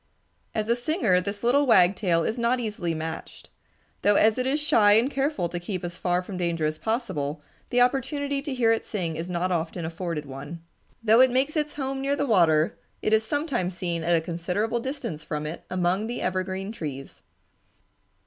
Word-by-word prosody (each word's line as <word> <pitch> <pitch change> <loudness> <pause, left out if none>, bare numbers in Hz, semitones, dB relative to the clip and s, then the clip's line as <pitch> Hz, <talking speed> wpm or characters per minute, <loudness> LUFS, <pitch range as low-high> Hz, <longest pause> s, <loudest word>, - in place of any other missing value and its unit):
As 215 -1 -1
a 235 - +3
singer 240 - +1
this 200 +3 -5
little 275 +4 +3
wagtail 180 -4 +4
is 220 +8 -2
not 235 +2 +2
easily 205 -8 -2
matched, 160 +1 -7 0.5
though 205 0 +4
as 220 +4 +4
it 255 - 0
is 285 +3 +1
shy 215 -8 +5
and 235 +6 +3
careful 275 - 0
to 175 - -4
keep 180 +1 -5
as 175 -1 -5
far 180 0 0
from 185 0 -7
danger 170 -3 -1
as 155 0 -2
possible, 190 - -2 0.3
the 245 0 +3
opportunity 280 +2 +1
to 285 -1 -4
hear 235 -3 +3
it 225 - +1
sing 175 -6 -3
is 165 +3 -5
not 180 +1 -1
often 170 0 -2
afforded 165 -2 -4
one. 145 +5 -8 0.4
Though 225 +2 +6
it 260 - +7
makes 265 +5 +1
its 300 -1 -1
home 270 -1 -3
near 275 +1 +1
the 285 - 0
water, 165 - +3 0.2
it 215 - +1
is 220 0 +4
sometimes 240 - -1
seen 170 -3 -2
at 170 +1 +3
a 165 - +2
considerable 180 +8 -2
distance 235 - -5
from 150 -1 -4
it 155 +3 -6
among 185 +3 0
the 240 +1 -4
evergreen 190 +2 -2
trees. 145 - -7
200 Hz, 190 wpm, -26 LUFS, 170-245 Hz, 0.5 s, it